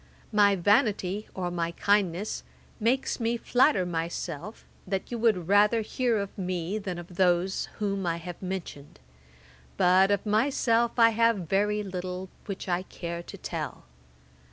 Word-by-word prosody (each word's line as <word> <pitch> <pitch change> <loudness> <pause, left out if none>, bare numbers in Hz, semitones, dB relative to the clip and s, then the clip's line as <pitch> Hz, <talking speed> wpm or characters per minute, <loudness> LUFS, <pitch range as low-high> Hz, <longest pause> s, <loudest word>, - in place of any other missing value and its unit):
] - - -29
'My 205 -2 +5
vanity, 205 0 +1
or 180 -2 -2
my 170 -1 -2
kindness, 200 0 +1 0.4
makes 245 +5 +1
me 235 0 0
flatter 245 -5 +3
myself, 170 +2 -4 0.2
that 195 +3 -3
you 235 - -3
would 215 -7 +2
rather 210 +3 +4
hear 235 +1 0
of 200 -1 -4
me 185 +1 -2
than 185 -4 -5
of 175 0 -10
those 180 +1 +2
whom 200 -3 -1
I 165 0 0
have 175 0 -8
mentioned; 180 - -6 0.8
but 185 +2 +5
of 200 0 +1
myself 230 +1 +2
I 230 -1 +7
have 225 -5 +2
very 210 +3 +1
little 185 -1 -5 0.2
which 195 -1 -5
I 180 0 +1
care 170 -2 -6
to - - -10
tell. - - -5
195 Hz, 150 wpm, -28 LUFS, 180-215 Hz, 0.8 s, I